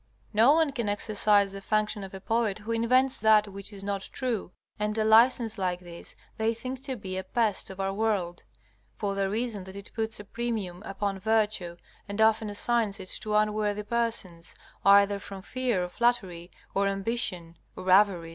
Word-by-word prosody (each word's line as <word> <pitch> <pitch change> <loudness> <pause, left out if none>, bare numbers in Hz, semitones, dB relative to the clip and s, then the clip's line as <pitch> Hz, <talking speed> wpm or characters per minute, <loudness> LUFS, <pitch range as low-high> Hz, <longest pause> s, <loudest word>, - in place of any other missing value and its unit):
No 230 +7 +6
one 320 -2 +3
can 235 -6 -2
exercise 205 -1 +2
the 195 0 -8
function 210 0 0
of 190 - -8
a - - -7
poet 225 0 0
who 215 +2 -6
invents 250 +3 +2
that 215 0 +4
which 200 +1 -7
is 200 -1 -5
not 200 -1 -3
true, 240 -8 -3 0.3
and 210 +1 -1
a 220 - +2
license 225 0 +4
like 180 -2 -1
this 175 -1 -8 0.2
they 225 +1 +1
think 255 +3 -6
to 265 -2 -3
be 190 -4 -6
a - - -5
pest 215 0 0
of 190 0 -10
our 195 0 -1
world, 195 -5 -1 0.5
for 200 -1 -2
the 195 -1 0
reason 220 -1 -2
that 190 0 -10
it 200 0 -9
puts 220 -1 -2
a - - -7
premium 210 -5 -4
upon 195 0 -3
virtue 210 -5 0 0.3
and 200 +1 -4
often 220 0 +3
assigns 215 0 0
it 185 -1 -7
to 215 -1 -2
unworthy 210 -1 +1
persons, 210 -7 -2 0.3
either 200 +1 +5
from 195 -1 -9
fear 245 -5 -1
of 180 - -5
flattery, 190 -8 0 0.2
or 200 0 +2
ambition, 195 -4 -2 0.2
or 185 - -8
avarice. 185 -4 +4
210 Hz, 185 wpm, -28 LUFS, 195-225 Hz, 0.5 s, No